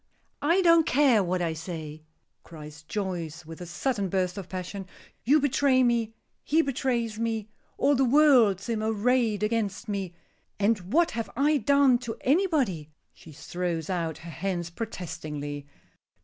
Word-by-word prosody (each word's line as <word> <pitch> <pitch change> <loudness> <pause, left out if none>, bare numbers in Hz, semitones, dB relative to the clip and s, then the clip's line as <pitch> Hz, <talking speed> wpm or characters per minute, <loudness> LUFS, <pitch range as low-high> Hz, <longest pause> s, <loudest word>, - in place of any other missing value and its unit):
"I 340 +6 +3
don't 335 -2 +5
care 260 -6 +4
what 180 0 -1
I 165 -1 -1
say," 160 -2 -7 0.4
cries 150 -2 -11
Joyce, 175 -3 -4
with 165 +2 -10
a 175 - -7
sudden 200 +2 -2
burst 185 -1 -1
of 195 -3 -7
passion. 185 +1 -6 0.4
"You 290 +6 +5
betray 275 -2 +3
me; 230 -2 +1 0.3
he 320 +2 +2
betrays 240 -5 -1
me; 225 -2 -2 0.3
all 285 +1 +3
the 270 -1 +2
world 255 - +5
seem 225 +1 -3
arrayed 220 0 +1
against 215 0 -1
me. 195 -4 -4 0.4
And 200 -3 0
what 335 +4 +3
have 230 -3 -4
I 295 +2 +3
done 275 0 +4
to 235 -2 -6
anybody?" 270 - +1 0.2
She 160 - -15
throws 170 +2 -4
out 165 -3 -2
her 170 - -7
hands 175 0 -3
protestingly. 155 -8 -6
210 Hz, 150 wpm, -27 LUFS, 175-255 Hz, 0.4 s, don't